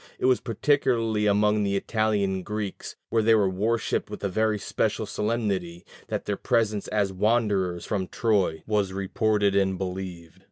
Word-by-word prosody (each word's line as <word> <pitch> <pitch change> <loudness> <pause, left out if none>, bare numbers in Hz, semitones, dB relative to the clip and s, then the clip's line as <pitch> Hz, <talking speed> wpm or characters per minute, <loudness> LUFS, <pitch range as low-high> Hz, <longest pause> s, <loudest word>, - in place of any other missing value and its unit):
It - - -2
was 130 -1 +4
particularly 115 -3 +1
among 105 +1 +3
the 100 0 0
Italian 100 -2 0
Greeks, 105 0 -5
where 115 - +2
they 110 +1 +5
were 105 -3 +3
worshipped 110 +5 -1
with 105 - -8
very 110 +2 +1
special 100 - -1
solemnity, 100 -6 -2 0.2
that - - -3
their - - -2
presence 110 -3 0
as 100 -2 0
wanderers 100 -4 +1
from 95 -3 -2
Troy 100 -9 0
was 105 -3 0
reported 100 +1 +1
and 95 -1 +2
believed. 90 -2 -6
105 Hz, 150 wpm, -26 LUFS, 95-110 Hz, 0.2 s, they